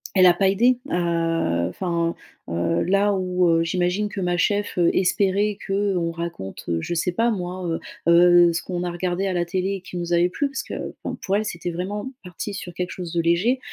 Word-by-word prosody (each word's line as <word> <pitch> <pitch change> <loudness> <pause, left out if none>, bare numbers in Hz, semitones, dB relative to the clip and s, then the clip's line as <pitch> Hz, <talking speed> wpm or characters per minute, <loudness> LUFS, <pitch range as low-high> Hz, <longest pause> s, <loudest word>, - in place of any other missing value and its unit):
elle 185 -1 +6
a 180 - +8
pas 190 +2 +2
aidé 240 +6 +3
à, 165 - 0
heu, - - -3
enfin, 170 - -1 0.3
heu, 85 - 0
là, 200 +2 +2
où, 180 -2 +1
heu, 165 0 +3
j'imagine 180 +4 0
que 205 - -6
ma 180 -1 0
cheffe, 205 +3 0
heu, 175 -1 +4
espérait 200 +2 +2
qu'on 195 -4 0
raconte, 170 - -6
heu, 85 -1 0
je 175 - -3
sais 170 +1 0
pas, 230 +5 +2
moi, 180 -2 -4
heu, 165 - -1 0.3
heu, 175 0 +7
ce 170 - -1
qu'on 180 -1 -3
a 175 - -2
regardé 180 +2 -1
à 190 - 0
la 175 -1 0
télé, 190 +2 -2
qui 185 - -11
nous 175 0 -4
avait 170 +1 +4
plu- 285 +10 -1
parce 270 - -4
que, - - -6
bon, - - -3
pour 195 +1 -1
elle, 215 - -1
c'était 175 -3 -4
vraiment 205 +8 -4
parti 180 +3 -6
sur 180 -3 -7
quelque 180 +1 -3
chose 175 -2 -6
de 170 - +2
léger- 180 +10 +2
180 Hz, 220 wpm, -23 LUFS, 170-195 Hz, 0.3 s, a